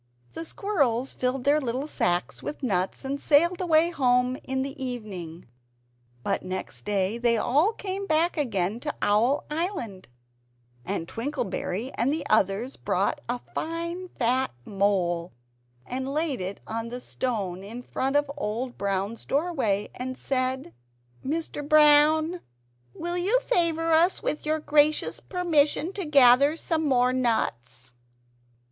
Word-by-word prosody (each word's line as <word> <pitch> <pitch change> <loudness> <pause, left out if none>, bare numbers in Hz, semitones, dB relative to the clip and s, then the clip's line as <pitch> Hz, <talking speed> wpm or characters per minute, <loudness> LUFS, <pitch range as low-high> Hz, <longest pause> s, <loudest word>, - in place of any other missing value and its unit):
The 330 - -6
squirrels 280 - 0
filled 255 0 -1
their 290 +2 +3
little 255 +2 -2
sacks 180 -11 -1
with 295 - -6
nuts, 190 +1 -1
and 275 +1 -3
sailed 340 +5 +3
away 335 -1 +3
home 250 -3 +2
in 265 0 -1
the 270 0 -6
evening. 195 - -6 0.8
But - - 0
next 185 +2 -6
morning 205 +3 0
they 235 -1 +3
all 290 - +3
came 395 -1 -5
back 325 +2 +2
again 220 - -1
to 295 +3 -4
Owl 225 +8 +3
Island; 300 - -3 0.8
and 180 -3 -3
Twinkleberry 240 -2 -3
and 240 +4 +1
the 310 +1 -2
others 200 +7 +1
brought - - 0
a 245 0 -2
fine 335 +3 -3
fat 255 +2 +1 0.2
mole, 185 -5 0 0.5
and 260 +2 -4
laid 300 - -1
it 190 +2 -5
on 230 +1 -4
the 245 +1 -5
stone 200 -9 -3
in 230 +5 -8
front 270 +3 -2
of 290 0 +4
Old 245 -1 -4
Brown's 200 +3 -2
doorway, 270 - 0
and 255 +1 -5
said 260 - -2 0.5
"Mr. 295 0 -3
Brown, 310 +3 +5 0.5
will 345 +1 -2
you 415 +8 +3
favour 330 -8 +1
us 340 +4 +3
with 300 - -2
your 310 +1 +2
gracious 300 0 +2
permission 340 -1 +1
to 390 -3 -4
gather 280 0 +6
some 320 -2 -1
more 250 -2 +3
nuts?" 125 - -1
265 Hz, 135 wpm, -26 LUFS, 220-310 Hz, 0.8 s, gather